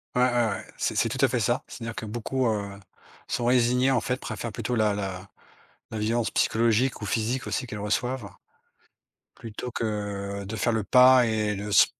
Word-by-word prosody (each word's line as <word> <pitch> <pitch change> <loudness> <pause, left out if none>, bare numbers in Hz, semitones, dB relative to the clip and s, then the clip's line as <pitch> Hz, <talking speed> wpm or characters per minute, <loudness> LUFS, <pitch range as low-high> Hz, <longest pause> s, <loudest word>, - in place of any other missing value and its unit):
Ouais, 125 - +3
ouais, 125 0 +4 0.2
ouais, 100 -3 -4
c'est - - -1
c'est - - +2
tout - - -4
à - - +3
fait - - -1
ça. - - 0
C'est-à-dire 115 -1 -7
que - - -5
beaucoup, 120 +4 -2
heu, 100 -3 -2 0.5
sont 120 - -2
résignées, 125 +1 +3
en 130 -2 +3
fait, 125 +2 -2
préfèrent 120 - -5
plutôt 125 +4 -3
la 110 -2 +2
la 95 -2 -4 0.6
la 110 - -4
violence 115 +2 0
psychologique 115 +2 +2
ou - - -4
physique, 120 +6 -1
aussi, 130 - -2
qu'elles 105 -2 -6
reçoivent 115 +2 -2 1.1
plutôt 115 +2 -7
que, 100 -3 -3
de 105 +3 -5
faire 115 +4 +1
le 110 -2 0
pas 125 +1 +7
et 110 -2 0
le 105 +1 -5
se 100 - +7
110 Hz, 190 wpm, -26 LUFS, 105-125 Hz, 1.1 s, pas